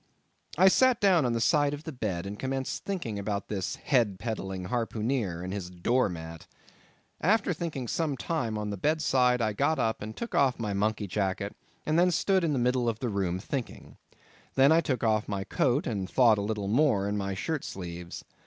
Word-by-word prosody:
I 185 +3 +7
sat 255 +4 +4
down 180 -9 +4
on 120 - 0
the 115 - 0
side 145 +3 +3
of 145 - -12
the 160 - -6
bed, 100 - -3
and 100 +1 -6
commenced 135 0 -3
thinking 145 - -3
about 100 0 -3
this 95 -4 -2
head 115 -9 +1
peddling 95 -4 -4
harpooneer, 115 -6 -1
and 95 +1 -4
his 95 -3 -4
door 105 +7 +1
mat. 80 -1 -8 0.7
After 200 0 +2
thinking 155 -7 -4
some 150 +1 -1
time 120 -10 -2
on 105 -1 -3
the 100 - -4
bed 155 - 0
side, 125 -3 +3
I 110 -1 0
got 145 +8 +1
up 110 0 0
and 110 +1 -7
took 235 - -5
off 135 -3 +3
my 105 -3 -2
monkey 105 +1 0
jacket, 100 +1 -2 0.3
and 155 +2 +2
then 180 +1 +5
stood 190 +2 +2
in 160 -3 +1
the - - 0
middle 125 0 +2
of 110 - -3
the 120 +1 -2
room 95 -4 -1
thinking. 125 +6 -6
I - - -29 0.4
then 150 +5 +6
took 130 -7 -2
off 110 -2 +2
my 100 -1 -2
coat, 125 +7 +1
and 100 -5 -3
thought 115 -5 +4
a - - -1
little 105 -1 -2
more 110 -4 +2
in 105 - -1
my 100 -1 -2
shirt 150 +9 -2
sleeves. 90 -2 -7
115 Hz, 205 wpm, -28 LUFS, 100-145 Hz, 0.7 s, I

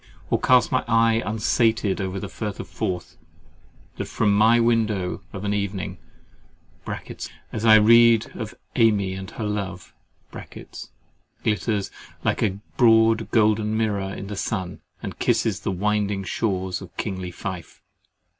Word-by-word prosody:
Or - - +3
cast 125 -2 +4
my 130 - +1
eye 115 0 +3
unsated 110 -1 +1
over 95 0 -3
the - - -5
Firth 105 -2 -5
of - - -6
Forth, 90 -2 -4 0.8
that - - -3
from 100 -1 +1
my 110 +3 +5
window 110 -6 +1
of 100 +1 -6
an 100 - 0
evening 100 -3 -3 1.5
(as 110 +1 -2
I 110 -1 +8
read 115 +1 +5
of 110 -2 -6 0.2
AMY 105 -5 +3
and 95 0 -7
her 115 - -6
love) 100 -3 -4 1.5
glitters 105 -2 -1 0.3
like - - +1
a 100 -3 +1 0.2
broad 115 -2 +4
golden 110 -1 +2
mirror 100 -3 -1
in 100 - -6
the 100 +1 -6
sun, 95 -3 -3 0.2
and - - -6
kisses - - +1
the - - -3
winding 100 +1 0
shores 95 -2 -2
of 90 -2 -12
kingly 95 -4 -3
Fife? 90 -1 -7
105 Hz, 135 wpm, -24 LUFS, 95-115 Hz, 1.5 s, I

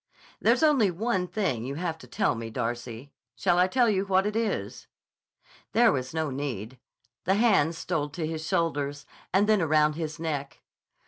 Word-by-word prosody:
"There's - - +3
only 280 -10 +4
one 185 0 -1
thing 155 - -1
you 135 +3 -4
have 165 0 -3
to 125 - -13
tell - - +1
me, 115 -1 -6
Darcy. 120 +3 -5 0.2
Shall 180 -2 +2
I 180 - +5
tell 245 +5 +3
you 195 -3 +2
what 190 0 +2
it 210 +1 -2
is?" 225 -2 -2 0.9
There 230 0 +5
was 130 -4 -2
no 160 -2 -2
need. 130 -4 -5 0.5
The 190 - +3
hands 195 -8 +3
stole 160 -5 -2
to 160 +2 -4
his 160 0 -4
shoulders, 145 -4 -1 0.3
and 195 +3 +3
then 215 -3 +4
around 155 -1 +3
his 160 0 -5
neck. 145 -4 -4
160 Hz, 175 wpm, -27 LUFS, 140-195 Hz, 0.9 s, I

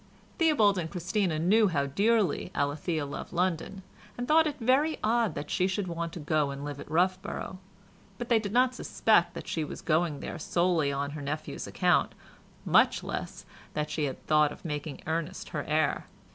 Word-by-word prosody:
Theobald 220 - +4
and 160 -2 -3
Christina 180 -1 -1
knew 205 +7 +4
how 145 -6 0
dearly 205 +7 +1
Alethea 145 +2 -1
loved 140 - -7
London, 180 +2 -1 0.3
and 245 0 -3
thought 315 +1 +5
it 295 - -4
very 265 +7 +2
odd 230 0 +2
that 145 - -5
she 185 - +2
should 190 0 -2
want 170 -1 -3
to - - -6
go 150 -1 +1
and 140 +1 -6
live 145 -1 -5
at - - -9
Roughborough, 185 +2 -1 0.6
but 240 - -5
they 235 -2 +4
did 205 -2 -4
not 250 +2 +3
suspect 195 -8 +2
that - - -7
she 160 - -1
was 150 - -7
going 160 -2 +1
there 170 - -6
solely 170 -3 +1
on 140 +1 -2
her 150 0 -6
nephew's 150 +2 -4
account, - - +2 0.5
much - - +4
less - - -5 0.3
that 150 0 -2
she 150 0 0
had 135 - -6
thought 150 -1 +4
of - - -12
making 150 -1 -4
Ernest 165 +3 -3
her 150 -4 -3
heir. 155 0 0
170 Hz, 185 wpm, -29 LUFS, 150-205 Hz, 0.6 s, thought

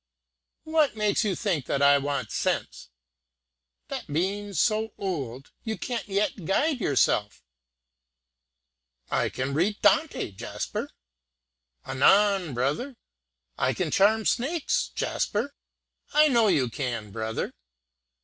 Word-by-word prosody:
"What 315 -5 +2
makes 210 0 +1
you 200 -4 0
think 170 - -1
that 140 - 0
I 140 0 +6
want 140 -4 -3
sense?" - - -2 1.0
"That - - -5
being 200 +5 -1
so 220 +1 +1
old, 135 - -4
you 220 -2 -3
can't 240 -4 -4
yet 200 -2 -1
guide 270 - +1
yourself!" 105 - +1 1.7
"I - - +1
can 130 +2 -3
read 190 +8 +1
Dante, 315 - +2
Jasper." 95 - -5 1.0
"Anan, 190 +3 +3
brother." 150 - -1 0.6
"I 130 +1 +1
can 175 -5 -2
charm 215 +2 +3
snakes, 280 +6 0
Jasper." 280 - -1 0.6
"I 305 0 +6
know 235 -4 +4
you 150 -10 +3
can, 120 -4 -4
brother." 110 +1 -3
195 Hz, 110 wpm, -26 LUFS, 135-220 Hz, 1.7 s, I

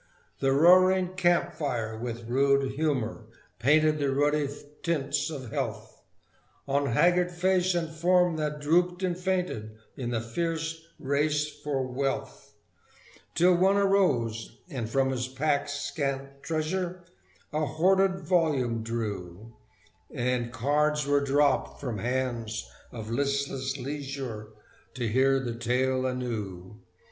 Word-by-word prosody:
The 135 -1 +2
roaring 185 +5 +5
camp 175 -2 +2
fire, 120 -8 -2
with 115 0 -5
rude 135 +2 +2
humour, 130 -7 -1 0.3
painted 155 +5 +4
The 140 -1 +1
ruddy 145 +1 +1 0.3
tints 145 -3 0
of 130 -7 -7
health - - -4 0.7
On 140 +1 +1
haggard 180 +8 +3
face 185 +1 +2
and 170 -1 0
form 175 +2 +2
that 150 -1 -2
drooped 175 +5 +2
and 180 -2 0
fainted 180 - -2 0.2
In 125 -3 -4
the 120 -2 0
fierce 160 +6 -3
race 150 +1 +1
for 140 -3 -3
wealth; 135 +2 -4 0.8
Till 180 +2 +5
one 190 +3 +4
arose, 145 - +1
and 120 -5 -3
from 135 +2 +2
his 125 -1 -2
pack's 145 +2 0
scant 140 -1 -3
treasure 175 +4 -2 0.5
A 155 +1 0
hoarded 190 +5 +2
volume 145 -11 +1
drew, 110 -2 -5 0.6
And 120 -1 -1
cards 150 +4 +1
were 145 0 +3
dropped 140 +1 +1
from 120 -7 -4
hands 120 -2 -2 0.2
of 110 -2 -7
listless 140 0 -1
leisure 135 -5 -5 0.5
To 120 -3 -2
hear 135 +4 +3
the 120 -3 -3
tale 130 +2 0
anew. 105 -6 -5
140 Hz, 120 wpm, -28 LUFS, 125-165 Hz, 0.8 s, roaring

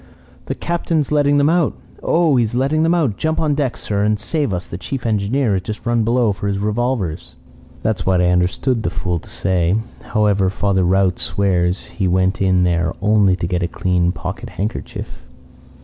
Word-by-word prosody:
"'The - - -2
Captain's 165 -4 -1
letting 145 -1 +3
them 145 0 +4
out. 165 -1 +2 0.3
Oh, 165 -4 +2
he 120 - +4
is 110 +1 -3
letting 140 +5 +1
them 165 +2 +3
out! 140 - 0
Jump 160 0 -1
on 155 -2 +1
deck, 140 -4 -1
sir, 100 -1 -2
and 105 0 +1
save 145 +3 -1
us. 90 -1 -3
The 85 - -7
chief 135 +2 -5
engineer 110 +2 +1
has 95 - 0
just 105 +4 -7
run 120 -1 +2
below 115 -1 +2
for 100 +1 -4
his 100 -1 -1
revolver.' 105 -4 -1 0.7
"That's 110 -2 0
what 95 -1 +2
I 90 0 +3
understood 95 +8 +1
the 95 - -1
fool 90 -1 -2
to - - -15
say. 90 0 +1 0.3
However, 105 -3 +1
Father 95 -1 0
Rout 95 +1 +2
swears 90 -2 0
he 95 -4 -2
went 95 +3 +1
in 95 -1 +3
there 85 -2 +1
only 105 -2 +3
to 90 - -3
get 90 +1 -1
a 85 - 0
clean 90 0 0
pocket - - -6
handkerchief. 105 +3 -5
105 Hz, 195 wpm, -19 LUFS, 90-130 Hz, 0.7 s, them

